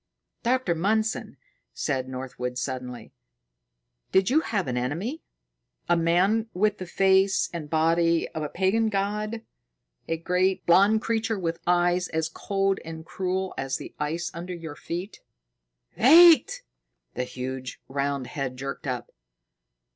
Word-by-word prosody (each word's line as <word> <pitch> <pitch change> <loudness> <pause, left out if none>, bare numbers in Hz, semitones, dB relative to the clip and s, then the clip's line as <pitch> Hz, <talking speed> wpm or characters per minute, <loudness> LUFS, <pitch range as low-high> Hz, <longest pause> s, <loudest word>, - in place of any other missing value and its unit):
"Doctor 250 -6 +1
Mundson," 215 +7 -1 0.4
said 130 -3 -2
Northwood 125 -1 -5
suddenly, 125 -2 -5 1.0
"did 190 +4 +3
you 305 - +5
have 215 - -2
an 125 - -2
enemy, 165 - -2 0.7
a 175 - +4
man 185 +7 +2
with 210 +2 +1
the 185 - -6
face 190 +1 +3
and 160 -3 -5
body 165 +1 +2
of 160 - -5
a 150 - -3
pagan 200 +6 +1
god 210 +2 -2 0.6
a 165 - -1
great, 180 +3 0
blond 200 +6 +5
creature 225 -1 0
with 165 -3 -2
eyes 175 0 +2
as 160 0 -2
cold 195 +3 -1
and 160 0 -8
cruel 190 +1 -2
as 135 0 -2
the - - -9
ice 160 +4 -2
under 175 +2 -6
our 145 - -7
feet?" 175 +7 -6 0.7
"Wait!" 330 +6 +7 0.5
The 125 - -2
huge 130 0 -6
round 140 -1 -2
head 130 0 -4
jerked 135 +1 -5
up. 125 -2 -4
175 Hz, 130 wpm, -26 LUFS, 145-200 Hz, 1.0 s, Wait